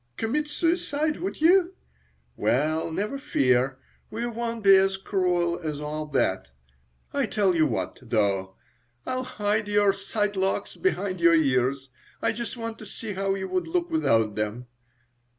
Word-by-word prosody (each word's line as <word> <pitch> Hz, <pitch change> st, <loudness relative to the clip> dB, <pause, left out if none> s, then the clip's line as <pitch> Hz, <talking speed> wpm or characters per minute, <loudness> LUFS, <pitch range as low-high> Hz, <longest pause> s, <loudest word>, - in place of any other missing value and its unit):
Commit 295 Hz, +7 st, -1 dB
suicide, 310 Hz, -1 st, 0 dB
would 370 Hz, -3 st, -5 dB
you? 360 Hz, +2 st, +4 dB, 0.6 s
Well, 155 Hz, +5 st, 0 dB
never 210 Hz, +11 st, -2 dB
fear; 130 Hz, -, +1 dB, 0.3 s
we 230 Hz, +2 st, -3 dB
won't 230 Hz, -1 st, -4 dB
be 195 Hz, -1 st, +8 dB
as 195 Hz, 0 st, +3 dB
cruel 180 Hz, -3 st, 0 dB
as 155 Hz, -4 st, -4 dB
all 150 Hz, +1 st, -4 dB
that. 120 Hz, -, 0 dB, 0.7 s
I -, -, +1 dB
tell 195 Hz, -3 st, +2 dB
you 160 Hz, -2 st, +3 dB
what, 95 Hz, -8 st, -3 dB
though. 100 Hz, -5 st, 0 dB, 0.5 s
I'll 255 Hz, 0 st, -2 dB
hide 210 Hz, -3 st, -1 dB
your 205 Hz, -1 st, +3 dB
side 205 Hz, +1 st, -2 dB
locks 190 Hz, +1 st, -1 dB
behind 200 Hz, -, -1 dB
your 170 Hz, 0 st, +6 dB
ears. 135 Hz, -2 st, +1 dB, 0.3 s
I -, -, +1 dB
just 235 Hz, +1 st, -5 dB
want 230 Hz, -1 st, -5 dB
to 215 Hz, -, -9 dB
see 210 Hz, +1 st, -6 dB
how 195 Hz, 0 st, 0 dB
you 190 Hz, -1 st, -4 dB
would 185 Hz, 0 st, -1 dB
look 345 Hz, 0 st, -1 dB
without 115 Hz, -, +2 dB
them." 105 Hz, +3 st, -3 dB
195 Hz, 150 wpm, -26 LUFS, 140-230 Hz, 0.7 s, be